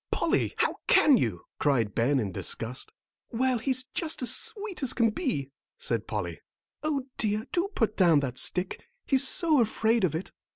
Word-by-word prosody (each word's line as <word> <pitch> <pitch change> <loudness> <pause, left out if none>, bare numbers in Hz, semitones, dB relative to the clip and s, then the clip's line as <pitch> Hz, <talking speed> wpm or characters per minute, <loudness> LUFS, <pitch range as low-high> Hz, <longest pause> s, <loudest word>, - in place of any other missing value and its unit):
"Polly, - - 0
how - - 0
can 295 -3 +6
you?" 110 - -1
cried 120 -8 +1
Ben, 130 +4 +2
in 105 -5 -2
disgust. 115 - -5 0.4
"Well, 255 +1 0
he's 255 +2 0
just 315 -5 0
as 245 0 +4
sweet 430 -5 -4
as 270 - -1
can 230 -2 +3
be," 210 - -3 0.3
said - - -3
Polly. - - -4 0.4
"O 300 -3 -1 0.2
dear, 215 0 0
do 355 +2 +1
put 215 -2 0
down 170 -6 +5
that 125 -2 -3
stick, 180 +1 -1 0.2
he's 270 -1 +6
so 310 -2 +3
afraid 225 0 +1
of 160 -4 +1
it." 165 - -5
225 Hz, 170 wpm, -28 LUFS, -, 0.4 s, can